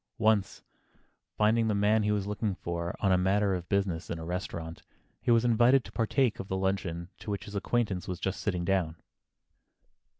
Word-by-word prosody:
Once, 110 -4 +1 0.7
finding 110 +2 +3
the 105 - +1
man 105 +2 +3
he 105 0 +1
was 105 -2 0
looking 105 -1 -2
for 85 0 -4
on 100 - +3
a 90 - +4
matter 100 +2 +2
of 90 -1 -4
business, 95 -4 0
in 85 - -3
a 80 - -7
restaurant, 85 -2 -5 0.4
he - - -3
was 115 0 +5
invited 120 +3 +5
to - - -10
partake 115 +1 +1
of 95 - -5
the 95 - -2
luncheon 95 -3 -2
to - - -8
which 100 0 -3
his 105 - -9
acquaintance 100 -3 -1
was 90 -1 -4
just 95 0 -2
sitting 90 -4 -1
down. 90 -4 +1
100 Hz, 190 wpm, -29 LUFS, 90-110 Hz, 0.7 s, was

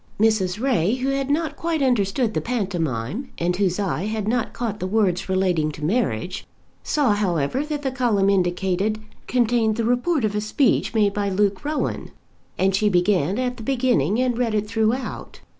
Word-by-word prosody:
Mrs. 210 -3 +2
Ray, 235 -5 +1
who 260 +1 -2
had 275 0 -1
not 310 +2 0
quite 330 -3 -1
understood 230 -2 +1
the - - -1
pantomime, 185 - -2
and 175 +1 0
whose 185 -1 0
eye 195 -2 -1
had 215 -1 -3
not 235 0 0
caught 220 -4 -4
the 185 - -2
words 190 -3 +1
relating 180 -5 +1
to 150 - -5
marriage, 185 - -1 0.3
saw 290 -7 +1
however 190 - 0
that 300 -1 -4
the 265 - -1
column 235 -7 +1
indicated 190 +2 +1 0.3
contained 235 -3 +2
the 230 - 0
report 245 +3 +1
of 210 - -1
a 210 - -1
speech 230 +3 +1
made 205 -2 +3
by 205 -1 -1
Luke 195 0 0
Rowan, 300 +1 -2 0.5
and 190 0 +2
she 210 +2 +2
began 180 -1 +2
it - - 0
at 250 0 -3
the - - -9
beginning 240 - +1
and 250 -2 0
read 230 -3 0
it 210 0 0
throughout. 225 +4 -2
215 Hz, 180 wpm, -23 LUFS, 190-250 Hz, 0.5 s, made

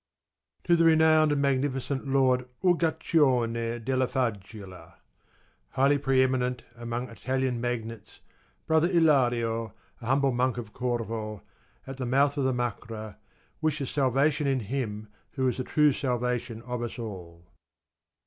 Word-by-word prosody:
To 170 - +4
the 165 - +3
renowned 160 -1 +5
and 145 - +1
magnificent 135 0 -1
lord 130 -2 +2
Uguccione 130 -9 +1
della 130 0 +1
Faggiola, 100 -8 -5 0.8
highly 140 +2 +3
pre 135 -1 +3
eminent 125 -1 -1
amongst 120 0 -6
Italian 130 -2 -1
magnates, 115 -3 -5 0.5
brother 160 +2 +3
Ilario, 120 - +2 0.3
a 115 - -7
humble 135 +1 +2
monk 125 0 0
of 115 -3 -7
Corvo, 115 -4 -3 0.4
at 135 0 -8
the 130 -2 -3
mouth 140 +3 +2
of 135 - +1
the 130 - +2
Macra, 110 -3 -4 0.4
wishes 155 -4 -1
salvation 140 +2 +1
in 135 -2 +1
him 110 -2 -4 0.3
who 130 -2 0
is 125 - -1
the 130 - -2
true 150 +1 +3
salvation 125 -3 -2
of 125 -1 -4
us 120 +1 -5
all. 90 -7 -8
125 Hz, 130 wpm, -27 LUFS, 115-140 Hz, 0.8 s, renowned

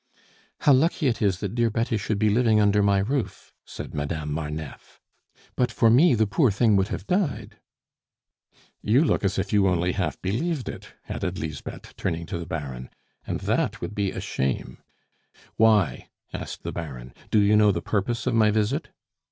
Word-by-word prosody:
"How 145 - +5
lucky 155 +4 +2
it 115 - -2
is 95 -3 +1
that 100 -3 -3
dear 120 -1 +2
Betty 115 +1 -1
should 105 0 -1
be 105 0 +2
living 110 -1 +3
under 105 0 +3
my 100 -1 +3
roof!" 120 +7 -2
said - - -8
Madame 75 0 -3
Marneffe. 75 -1 -6 0.6
"But 125 -1 +1
for 115 0 +3
me, 145 +4 +6
the 110 0 +3
poor 125 +6 +2
thing 105 +1 +3
would 95 0 +2
have 95 - -5
died." 180 - -1 1.2
"You 125 +9 +3
look - - +1
as 95 0 0
if 95 +2 -2
you 100 -2 +4
only 90 -1 +1
half - - -2
believed 135 - -2
it," - - -9
added 90 +1 -3
Lisbeth, 75 -4 -7
turning 85 -2 -2
to 85 - -5
the 85 - -7
Baron, 65 -5 -5 0.4
"and - - -3
that - - 0
would - - -5
be 100 -2 0
a - - -5
shame 65 -1 -3 0.4
" - - -29
"Why?" 105 - +3 0.3
asked - - -6
the - - -4
Baron. 65 -7 -7 0.2
"Do - - +2
you 105 +1 +4
know 105 -1 +5
the 85 -3 -3
purpose 115 +3 -1
of 130 - 0
my 110 -2 +4
visit?" 110 +8 0
105 Hz, 185 wpm, -25 LUFS, 85-115 Hz, 1.2 s, me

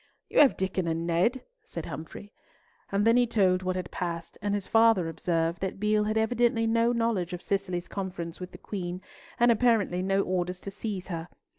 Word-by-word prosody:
"You - - +2
have 285 -3 +6
Diccon 190 -2 -1
and 165 0 -1
Ned," 180 +10 +1 0.2
said - - -7
Humfrey. 165 +6 -8 0.6
And 200 +1 +1
then 230 +1 +5
he 245 -1 +4
told 185 -5 +2
what 185 0 -1
had 180 -2 -4
passed, 170 -2 -4
and 205 0 0
his 200 -2 -3
father 225 -6 +4
observed 165 0 -1
that 190 0 -3
Beale 210 0 +2
had 215 +1 0
evidently 230 0 +2
no 230 +1 +3
knowledge 230 -7 0
of 180 - -5
Cicely's 185 -3 -2
conference 180 -4 -5
with 180 0 -7
the - - -10
Queen, 180 -2 -5 0.4
and 240 0 +6
apparently 220 -6 +2
no 195 +1 +1
orders 180 0 -2
to 195 - -6
seize 195 -3 -5
her. 165 -1 -4
190 Hz, 190 wpm, -28 LUFS, 180-225 Hz, 0.6 s, have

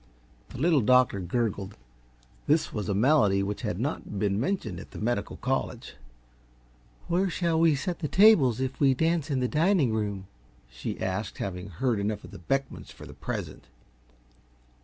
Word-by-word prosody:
The - - -9
Little 155 +1 +3
Doctor 125 -3 +4
gurgled. 100 +1 -2 0.7
This 155 +2 +2
was 105 -2 -3
a 100 - 0
malady 105 -5 +3
which 100 +1 -4
had - - -3
not 105 - -3
been 100 0 0
mentioned 115 - -2
at - - -11
the - - -11
medical 110 -2 -2
college. 130 -2 -3 1.1
"Where 185 +3 +1
shall 170 -2 0
we 165 -2 +4
set 170 +6 -3
the 155 - -2
tables, 165 - +5
if 130 0 -3
we 135 -2 +4
dance 160 +1 0
in 135 -3 0
the 125 - +1
dining 155 - +2
room?" 100 -3 -2 0.4
she 60 -1 -6
asked, 95 +2 -3
having 90 0 -5
heard 110 +5 -1
enough 105 +1 -2
of - - -11
the - - -10
Beckmans 135 +10 -3
for - - -12
the - - -11
present. - - -6
125 Hz, 165 wpm, -27 LUFS, 100-150 Hz, 1.1 s, tables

